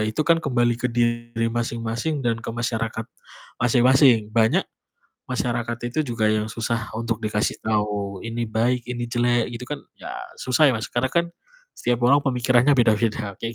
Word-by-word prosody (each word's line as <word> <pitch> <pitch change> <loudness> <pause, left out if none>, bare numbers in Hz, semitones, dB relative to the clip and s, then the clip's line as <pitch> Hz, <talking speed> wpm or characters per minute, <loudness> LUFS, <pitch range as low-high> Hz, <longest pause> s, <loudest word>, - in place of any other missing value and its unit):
itu 110 +8 -1
kan 165 -1 +4
kembali 120 -4 +1
ke 125 - 0
diri 120 -1 0
masing-masing 115 +4 -2
dan 115 -1 0
ke - - -8
masyarakat 115 -1 -2 0.6
masing-masing. 120 -2 +4
Banyak 110 0 +3 0.7
masyarakat 120 -2 -1
itu 120 +5 -4
juga 115 -5 -1
yang 110 0 +1
susah 115 0 -3
untuk 115 -1 -3
dikasih 105 -1 -1
tahu 105 -2 -1
ini 115 +1 -3
baik, 120 +3 +1
ini 120 -1 -3
jelek 120 0 +1
gitu 120 +1 -6
kan 145 - -3 0.2
ya - - -9 0.2
susah 130 +4 +2
ya 135 - +5
Mas. 110 - -4
Karena 120 +2 0
kan 170 0 +3 0.5
setiap 120 0 0
orang 135 +4 +6
pemikirannya 125 +2 +3
beda-beda 110 -3 +1
kayak 115 0 -4
120 Hz, 160 wpm, -23 LUFS, 115-125 Hz, 0.7 s, orang